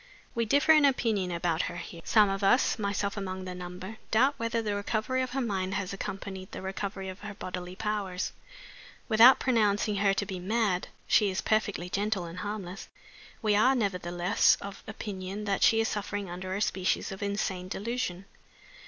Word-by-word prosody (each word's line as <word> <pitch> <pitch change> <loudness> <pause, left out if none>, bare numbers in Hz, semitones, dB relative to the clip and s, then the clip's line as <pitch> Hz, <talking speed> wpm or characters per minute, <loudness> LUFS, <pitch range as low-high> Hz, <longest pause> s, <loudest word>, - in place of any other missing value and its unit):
We 230 0 0
differ 285 +7 +4
in 305 -1 +7
opinion 225 -9 +2
about 170 -1 0
her 175 - -7
here. 170 -1 -8
Some 215 -2 +5
of 195 +1 -2
us 235 +4 +3
(myself 200 -1 -1
among 190 -1 -4
the 185 - -5
number) 180 +4 -7
doubt 260 +6 +4
whether 230 -1 -1
the 215 -2 -1
recovery 220 +5 -1
of 255 - -2
her 270 +2 -2
mind 195 -5 -1
has 200 -1 -2
accompanied 190 -1 -6
the - - -6
recovery 195 0 -4
of 185 0 -7
her 210 -1 -7
bodily 180 -1 -6
powers. 205 -3 -2 0.8
Without 235 +3 +8
pronouncing 210 -4 +2
her 195 0 +3
to 205 - -1
be 190 -2 -5
mad 200 -1 0 0.2
she 210 -2 +4
is 190 - -2
perfectly 205 -5 0
gentle 200 0 -1
and 170 +1 -7
harmless 195 -2 -5 0.5
we 210 -1 +3
are 255 +6 +5
nevertheless 180 -3 +2
of 200 0 -8
opinion 205 -2 -5
that 200 -1 0
she 225 - +5
is 225 - +2
suffering 205 -2 -3
under 185 +1 -4
a 200 - -2
species 190 -1 0
of 190 - -7
insane 200 -2 -2
delusion. 195 -2 -3
200 Hz, 180 wpm, -29 LUFS, 185-215 Hz, 0.8 s, Without